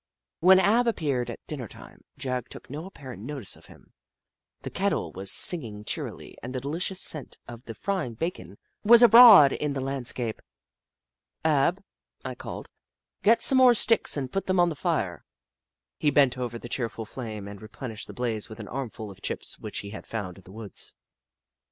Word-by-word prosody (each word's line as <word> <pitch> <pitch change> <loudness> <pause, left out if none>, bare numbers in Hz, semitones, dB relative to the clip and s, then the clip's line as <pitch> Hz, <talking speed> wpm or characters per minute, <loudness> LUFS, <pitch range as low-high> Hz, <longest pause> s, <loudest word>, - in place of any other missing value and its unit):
When 185 +2 +6
Ab 230 +5 +3
appeared 140 - -1
at 120 - -9
dinner 135 -7 -6
time, - - -15
Jagg 130 -2 -4
took - - -11
no 155 +5 -6
apparent 130 - -10
notice 130 -3 -4
of - - -18
him. - - -19 0.7
The - - -6
kettle - - -1
was 95 0 +1
singing 115 -12 +1
cheerily - - -5
and 125 +2 -7
the - - -1
delicious 170 +8 -3
scent 150 -7 +1
of 120 0 -11
the 115 - -8
frying 185 - -3
bacon 110 - -5 0.3
was 235 +3 +7
abroad 230 - +9
in 150 -1 -2
the 135 - -3
land 135 -2 -3
scape. 115 -4 -2 0.6
" - - -41
Ab," 160 +5 +2 0.4
1 - - -4
called, - - -8 0.5
"get 225 +3 +4
some 265 - +4
more 250 -2 +7
sticks 225 -6 +3
and 130 -3 -4
put 195 - -3
them 185 -1 +1
on 175 0 +4
the 160 - -5
fire." 130 - -2 0.8
He 150 - +2
bent 140 -3 +3
over 120 -2 -4
the 120 - -9
cheerful 115 -2 -3
flame 110 -3 -7
and 100 -1 -10
re 110 - -10
plenished 110 0 -7
the - - -9
blaze 120 -2 -3
with 110 - -10
an 105 - -8
armful 115 -5 -6
of 95 +1 -16
chips - - -4
which - - -5
he 100 - -9
had 110 - -9
found 100 -5 -5
in - - -19
the 95 - -14
woods. 110 0 -6
130 Hz, 190 wpm, -26 LUFS, 110-175 Hz, 0.8 s, abroad